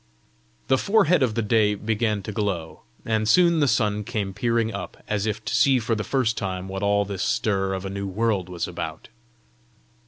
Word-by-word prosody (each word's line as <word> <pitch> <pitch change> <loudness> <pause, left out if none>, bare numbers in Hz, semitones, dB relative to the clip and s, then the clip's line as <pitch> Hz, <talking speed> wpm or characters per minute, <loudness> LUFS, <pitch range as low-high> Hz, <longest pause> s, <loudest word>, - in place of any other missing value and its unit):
The 130 +1 +3
forehead 195 -6 +3
of 120 -5 +1
the 115 - 0
day 105 -1 +3
began 105 -1 -1
to 110 - -5
glow, 95 -6 -3 0.2
and 110 -1 0
soon 170 +2 +5
the 145 - +3
sun 105 -4 +1
came 105 -3 -3
peering 115 +1 0
up, 90 -3 -6
as 105 0 -1
if 110 0 -3
to 135 - -3
see 130 +2 +4
for 115 -1 -1
the 105 -1 -1
first 120 -3 0
time 95 -2 -4
what 95 0 -5
all 100 0 +2
this 100 -2 -5
stir 95 -2 0
of 95 0 -6
a - - -3
new 100 0 -4
world 100 -2 -1
was 90 -2 -3
about. - - -6
105 Hz, 195 wpm, -24 LUFS, 100-115 Hz, 0.2 s, soon